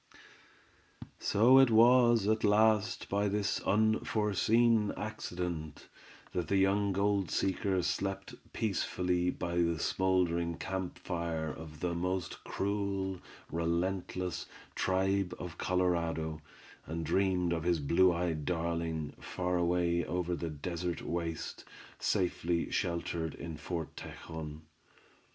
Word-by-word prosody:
So 120 +6 +5
it 135 -2 +6
was 120 -1 +6
at 110 0 +2
last 110 +1 +3
by 100 +1 +1
this 100 0 0
unforeseen 110 +1 +2
accident, 90 -7 -5 0.4
that 90 -3 -1
the 100 - +2
young 100 +1 +3
gold 100 -2 +1
seeker 95 -1 0
slept 95 +2 -2 0.2
peacefully 90 -4 0
by 85 -1 -3
the 85 -1 +2
smouldering 85 -2 +1
camp 95 -1 -4
fire 85 -3 -3
of 75 -1 -10
the 90 -1 0
most 90 +1 -3
cruel, 100 -2 -2 0.3
relentless, 90 +1 -1 0.3
tribe 95 0 +1
of 90 0 -6
the - - -16
Colorado, 85 -4 0 0.5
and 80 +1 -3
dreamed 90 -3 +2
of 80 - -1
his 85 0 +1
blue 85 +6 +4
eyed 85 -3 -1
darling, 80 -1 -2
far 90 0 -2
away 85 0 +2
over 90 0 -2
the 85 -1 -3
desert 85 +3 -4
waste, 85 -1 -4 0.4
safely 85 -2 0
sheltered 85 -3 -2
in 85 -1 -6
Fort 80 0 -5
Tejon. 80 -2 -8
90 Hz, 115 wpm, -32 LUFS, 85-100 Hz, 0.5 s, it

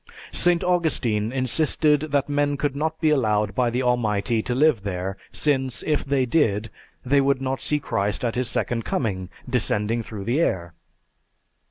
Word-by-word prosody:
St. 175 -1 +2
Augustine 135 -12 +1
insisted 150 +3 +2
that 140 -1 +1
men 145 0 0
could 140 -1 -1
not 160 +2 -2
be 155 -2 +3
allowed 105 -7 +1
by 125 +2 +1
the 125 +2 -1
Almighty 115 -2 +1
to 120 +2 -2
live 145 -4 +3
there, 95 -1 -3 0.2
since, 135 -4 0
if 150 -2 0
they 135 -1 +1
did, 115 -6 +1 0.3
they 140 +2 +4
could 135 -1 +2
not 135 0 -3
see 150 - 0
Christ 100 -4 -1
at 115 - 0
His 125 -1 -1
second 115 -2 -1
coming, 95 -8 -2 0.2
descending 115 -2 0
through 105 -3 -7
the 120 +9 0
air. 85 - -1
125 Hz, 165 wpm, -23 LUFS, 105-145 Hz, 0.3 s, they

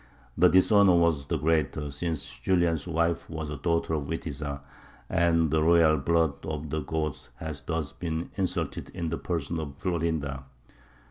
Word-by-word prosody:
The - - +6
dishonour 95 0 +5
was 80 -5 +2
the - - 0
greater, 75 -2 0
since 80 +1 -3
Julian's 85 +1 +1
wife 85 0 0
was 80 -2 -5
a - - -3
daughter 85 +2 0
of 75 -3 -1
Witiza, 70 -2 -4 0.5
and 85 -3 +2
the 80 0 +3
royal 80 -1 +5
blood 80 0 +1
of 75 -2 -4
the 80 - 0
Goths 75 -1 -3
had 75 -3 -6
thus 80 -3 -2
been 80 -1 -4
insulted 95 -2 -2
in 85 -2 -2
the 80 - -3
person 85 -1 -2
of 70 -3 -6
Florinda. 80 -8 -2
80 Hz, 155 wpm, -28 LUFS, 75-85 Hz, 0.5 s, The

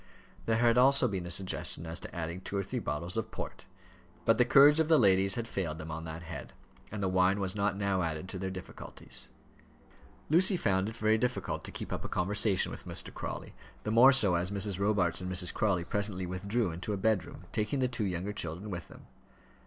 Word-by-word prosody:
There 110 -1 +2
had 120 +1 +4
also 135 0 +5
been 95 -5 -3
a - - -5
suggestion 90 -2 -1
as 80 +1 -5
to - - -10
adding 85 +2 -4
two 100 - -4
or 100 - 0
three - - -4
bottles 85 +7 -4
of 110 - -2
port; - - -7 0.6
but 115 0 +3
the 125 - +6
courage 140 +4 +7
of 160 - +2
the 160 -1 +5
ladies 95 -4 +4
had 115 -1 -3
failed 85 -8 -3
them 80 0 -7
on 80 +1 -5
that 80 +1 -7
head, 85 0 -8 0.4
and 105 -1 -4
the - - +2
wine 95 +2 +2
was 95 0 -2
not 100 -1 0
now 100 -2 0
added 80 +1 -3
to 95 - -6
their 95 0 -3
difficulties. 95 -1 -6 1.0
Lucy 185 +4 +5
found 95 - +1
it 110 - -9
very 110 0 +2
difficult 125 +2 -2
to - - -5
keep - - -6
up - - -4
a - - -6
conversation 100 +2 +2
with - - -9
Mr. - - -3
Crawley - - -6 0.3
the 105 - -2
more 120 +4 +8
so, 110 -9 +4
as 85 +1 0
Mrs. 100 -1 -1
Robarts 100 -4 +1
and 90 0 -4
Mrs. 90 -1 0
Crawley 95 -5 +1
presently 100 0 -2
withdrew 100 +3 -1
into 90 +5 -4
a - - -2
bedroom, 105 -2 -1
taking 105 +6 -1
the 130 -1 +2
two 120 -4 -3
younger 95 +2 -3
children 90 +3 -5
with 85 -2 -6
them. - - -15
100 Hz, 215 wpm, -31 LUFS, 90-110 Hz, 1.0 s, more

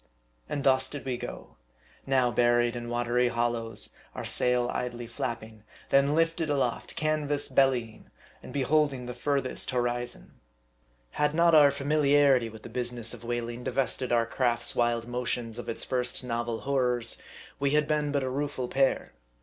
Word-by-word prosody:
And 140 - -2
thus 130 -1 +3
did 145 - -7
we 130 -2 -1
go. - - -8 0.5
Now 130 -2 +3
buried 120 +1 +3
in 120 -1 -5
watery 120 +1 +1
hollows 120 -1 -2 0.3
our - - -5
sail 125 -1 +1
idly 120 -1 -3
flapping; 110 -2 -5 0.3
then 140 +2 +4
lifted 165 -1 +1
aloft 135 -5 -1
canvas 150 -2 0
bellying; 125 -5 +1 0.3
and - - -10
beholding 140 -1 +1
the 125 - -5
furthest 135 +1 -1
horizon. 120 -1 -3 0.7
Had 150 +1 0
not 170 0 +4
our 150 -2 +8
familiarity 140 -3 +3
with 110 -1 -12
the - - -7
business 120 -2 -2
of 120 -1 -10
whaling 120 0 -3
divested 130 -1 -1
our 120 -1 +3
craft's 120 -1 0
wild 120 -1 +1
motions 120 -2 -2
of - - -6
its 115 - -1
first 125 0 -1
novel 120 -2 -2
horrors, 125 -4 +1 0.4
we 140 0 +2
had 150 -1 +3
been 150 -1 0
but 140 -1 0
a - - -2
rueful 135 -2 -2
pair. 135 +1 +1
125 Hz, 155 wpm, -28 LUFS, 120-140 Hz, 0.7 s, our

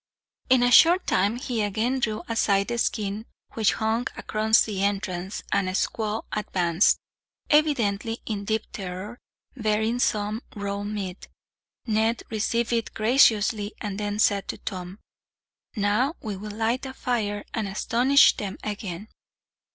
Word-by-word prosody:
In 255 -1 +5
a 245 - +3
short 345 +7 +7
time 200 +4 +2
he 245 -3 -2
again 220 +6 0
drew 215 -3 -1
aside 200 -3 +1
the 235 0 -2
skin 215 0 -1 0.3
which 220 -2 +2
hung 225 +2 0
across 220 0 +3
the 200 -3 -3
entrance, 195 -1 -2
and 195 -2 +1
a - - -3
squaw 215 +2 -1
advanced, 180 -3 +2 0.5
evidently 230 -8 +2
in 205 -2 -3
deep 220 +1 0
terror, 195 +4 -6 0.4
bearing 220 0 0
some 215 -1 0
raw 200 -1 -3
meat. 205 -3 -5 0.6
Ned 220 0 +1
received 230 +2 0
it 230 -1 -2
graciously, 215 -3 +3
and 205 -1 -4
then 205 0 -2
said 205 -2 +2
to - - -4
Tom: 185 0 -6 0.8
"Now 215 - +1
we 210 -2 -5
will 210 +3 -7
light 225 +5 -1
a 265 - -8
fire, 210 -6 -2
and 220 -3 -2
astonish 245 +7 +4
them 195 -2 -4
again." 205 -2 -5
215 Hz, 140 wpm, -25 LUFS, 200-230 Hz, 0.8 s, short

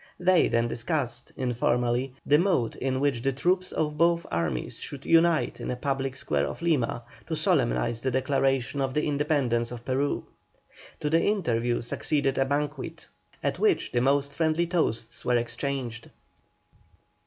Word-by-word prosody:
They 180 0 +4
then 115 0 +1
discussed, 120 0 -3
informally, 125 +1 0
the 150 +1 +5
mode 170 - +1
in 130 0 -1
which 140 -4 +1
the 135 - +1
troops 180 +7 0
of 150 -1 -2
both 170 0 +3
armies 80 -7 -2
should 140 -1 -8
unite 165 0 +3
in - - -5
the 125 - -1
public 135 0 -2
square 75 - -1
of - - -7
Lima 135 -8 +1 0.2
to - - -2
solemnise 60 - +1
the 130 - 0
declaration 135 +1 0
of 135 -1 -1
the 150 - +1
independence 140 -6 +1
of 120 -1 -8
Peru. 135 +2 0 0.8
To 150 - 0
the 165 +1 +4
interview 120 - 0
succeeded 135 +3 0
a 135 - +3
banquet, 145 +3 -3 0.4
at - - -1
which 420 -3 +2
the 120 - +1
most 140 +1 +1
friendly 160 +1 +1
toasts 120 -10 0
were 125 -1 +2
exchanged. 120 -1 -3
135 Hz, 155 wpm, -27 LUFS, 120-150 Hz, 0.8 s, the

